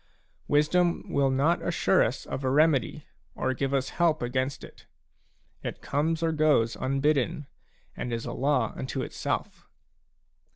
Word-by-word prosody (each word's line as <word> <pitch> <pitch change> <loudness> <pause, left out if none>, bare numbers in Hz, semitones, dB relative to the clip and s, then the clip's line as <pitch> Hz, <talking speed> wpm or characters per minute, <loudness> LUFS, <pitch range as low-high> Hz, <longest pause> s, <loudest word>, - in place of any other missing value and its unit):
Wisdom 170 +4 +2
will 140 -1 +2
not 140 +6 +2
assure 155 - +2
us 125 - -1
of 135 - -5
a 130 - +1
remedy, 150 +1 +2 0.3
or 130 - -1
give 135 +1 -2
us 135 -1 0
help 160 -5 +3
against 130 +2 -2
it; - - -14 0.7
it - - -6
comes 160 +3 0
or 165 - +2
goes 150 -7 +2
unbidden, 140 +2 0 0.5
and 125 - -4
is 115 -1 -3
a - - -4
law 130 -4 +1
unto 130 0 -4
itself. - - -4
140 Hz, 140 wpm, -27 LUFS, 130-155 Hz, 0.7 s, help